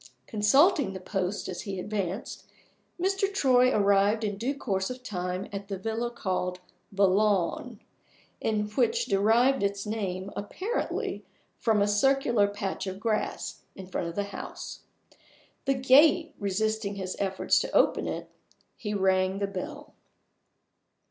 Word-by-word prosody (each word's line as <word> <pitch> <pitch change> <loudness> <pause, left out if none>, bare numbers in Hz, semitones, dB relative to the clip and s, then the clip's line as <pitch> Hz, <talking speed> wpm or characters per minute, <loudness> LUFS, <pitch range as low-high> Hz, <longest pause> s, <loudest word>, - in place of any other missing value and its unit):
Consulting 270 - +3
the 190 - -6
posts 190 +1 -2
as 185 - -5
he 195 -3 -5
advanced, 200 +1 -4 0.5
Mr. 390 +2 +1
Troy 255 -9 +4
arrived 205 +1 +3
in 205 -2 -1
due 245 +8 -2
course 195 -8 -1
of 250 0 -7
time 180 -4 -3
at 200 0 -5
the 195 -1 -4
villa 225 +4 -2
called 185 -5 -2 0.3
The 200 0 +4
Lawn, 205 +3 +1 0.9
which 235 -1 +2
derived 225 +7 +3
its 200 0 -1
name 200 -3 -3
apparently 380 - -3 0.4
from 215 -3 +3
a - - +1
circular 235 0 +3
patch 200 -1 -4
of 190 0 -5
grass 215 0 -2
in 190 - -8
front 180 -2 -3
of 170 - -6
the 205 - 0
house. - - -7 0.9
The 275 - +2
gate 290 +6 +5
resisting 205 +1 -1
his 190 -2 -4
efforts 195 -1 +2
to - - -3
open - - +3
it, - - -4 0.5
he 210 -2 -4
rang 190 -1 +2
the 200 - 0
bell. 290 +10 -7
205 Hz, 135 wpm, -28 LUFS, 195-245 Hz, 0.9 s, gate